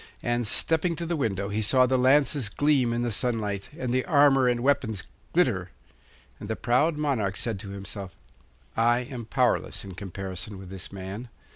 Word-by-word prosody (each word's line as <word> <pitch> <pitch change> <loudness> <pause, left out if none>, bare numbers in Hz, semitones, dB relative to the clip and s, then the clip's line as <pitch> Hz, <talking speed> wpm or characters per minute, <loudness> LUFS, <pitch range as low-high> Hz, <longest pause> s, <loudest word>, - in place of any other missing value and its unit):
And, 120 -1 0
stepping 165 - +2
to 170 +1 -4
the 170 +1 -1
window, 100 - -1
he 105 +2 -1
saw 130 +4 +4
the 130 +1 +1
lances 130 -1 +3
gleam 135 0 +2
in 120 +1 0
the 120 - -1
sunlight 105 -3 -2
and 125 -4 -2
the 130 0 +2
armour 140 -4 +5
and 120 -1 +1
weapons 120 -7 +1 0.3
glitter. - - +2 0.7
And 105 - -8
the 110 - 0
proud 140 +7 +2
monarch 125 -10 0
said 110 -5 -3
to 100 -1 -8
himself, 100 -1 -7 0.6
'I 120 +1 +4
am 120 -3 -6
powerless 125 -4 +1
in 95 - -8
comparison 95 +1 -5
with 95 -1 -10
this 95 -1 -6
man. 100 +5 -7
120 Hz, 175 wpm, -27 LUFS, 100-135 Hz, 0.7 s, armour